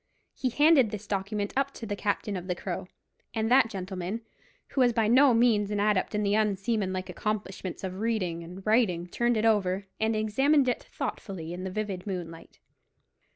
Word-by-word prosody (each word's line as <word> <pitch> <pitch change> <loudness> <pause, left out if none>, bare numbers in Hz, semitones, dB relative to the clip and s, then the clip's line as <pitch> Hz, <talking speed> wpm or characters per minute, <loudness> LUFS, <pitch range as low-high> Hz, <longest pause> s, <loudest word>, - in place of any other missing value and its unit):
He 255 - -1
handed 290 -2 +5
this 210 0 -6
document 205 +1 -2
up 275 +1 0
to 230 - -7
the 205 -1 -3
captain 205 0 -1
of 180 -1 -5
the 180 - -1
Crow, 180 0 -5 0.5
and 225 +1 0
that 255 -3 +6
gentleman, 190 +1 -4 0.5
who 270 - 0
was 245 -1 +4
by 225 -2 +2
no 260 +4 +6
means 225 -4 +3
an 210 -1 -1
adept 210 0 +1
in 210 - +1
the 200 0 +1
unseamanlike 200 -2 0
accomplishments 200 -4 -4
of 190 0 -4
reading 190 -7 -1
and 180 +3 -10
writing, 215 -6 +2
turned 240 +6 0
it 215 - +1
over, 200 -3 +2
and 220 0 +1
examined 265 +7 +3
it 250 - 0
thoughtfully 175 -5 -5
in 180 +1 -5
the - - -2
vivid 195 -1 -4
moonlight. 170 -4 -6
210 Hz, 180 wpm, -28 LUFS, 185-225 Hz, 0.5 s, that